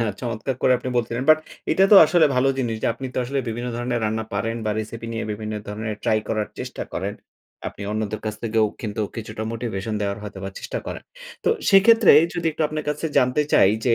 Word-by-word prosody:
না 115 - +2 0.2
চমৎকার 120 +1 -3
করে 130 - +5
আপনি 130 - -5
বলছিলেন। 120 +1 -1
বাট 155 - +7 0.3
এটা 190 - +4
তো - - +11
আসলে 160 +1 +4
ভালো 125 +2 +3
জিনিস 120 -4 -1
যে, - - +1
আপনি 130 - -6
তো - - -1
আসলে 135 +3 -2
বিভিন্ন 120 +2 -3
ধরনের 120 0 -2
রান্না 110 +1 -1
পারেন 115 +1 -1
বা 110 - 0
রেসিপি 115 +2 -7
নিয়ে 115 - -3
বিভিন্ন 110 +1 -5
ধরনের 110 +1 -4
ট্রাই 110 - +3
করার 110 -1 -1
চেষ্টা - - -5
করেন। - - -3 0.5
আপনি - - -10
অন্যদের 110 0 -3
কাছ 110 - -2
থেকেও 110 -1 +2 0.2
কিন্তু, 110 -1 -4 0.2
কিছুটা 110 -1 -6
মোটিভেশন 110 -2 -4
দেওয়ার 100 0 -2
হয়তো 100 -2 -8
বা 95 - -4
চেষ্টা - - -5
করেন। - - -6 0.4
তো - - +3 0.2
সেক্ষেত্রে 215 +2 +7 0.2
যদি 170 -1 -2
একটু 160 - -2
আপনার 155 -1 -4
কাছে 150 +2 -1
জানতে 125 +4 +2
চাই 95 - +6 0.2
যে, 115 - +5
115 Hz, 210 wpm, -23 LUFS, 110-130 Hz, 0.5 s, তো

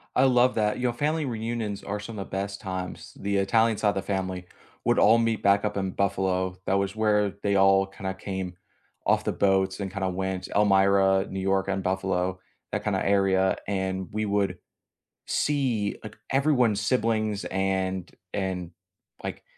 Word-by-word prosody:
I - - +5
love 125 -1 +4
that, 105 -1 +1
you 125 - -5
know, - - +1
family 150 +5 0
reunions 115 -4 -3
are 105 +1 -3
some 105 +1 -8
of 95 - -6
best 100 +1 -3
times. 95 -2 -6
The 100 0 0
Italian 110 +3 +3
side 105 - +2
of - - -1
the 95 - -1
family 95 -2 -3 0.4
would - - +2
all 110 +3 +6
meet 115 -1 0
back 100 0 +4
up 105 -1 -1
in 95 -1 -1
Buffalo, 95 -1 0
that - - +1
was 100 0 0
where 105 -2 +2
they 100 -1 +2
all 95 0 +5
kinda 95 0 -5
came 95 -2 -5 0.5
off - - +3
the - - 0
boats 95 -1 +2
and 100 -2 -4
kinda 95 -1 -2
went 95 0 -3
Elmira, 95 -1 +4
New 95 - -4
York, 95 0 +1
and 95 -1 -1
Buffalo, 95 -1 -1 0.3
that - - -2
kinda - - 0
area 95 -1 +3
and 95 -1 -2
we 110 +1 -1
would 100 -3 0 0.7
see, 125 -8 0
like, 110 0 -9
everyone's 130 -7 +3
siblings 110 -3 0
and 95 -1 -1 0.2
and, 95 -3 -3 0.5
like, - - -5
100 Hz, 170 wpm, -26 LUFS, 95-105 Hz, 0.7 s, all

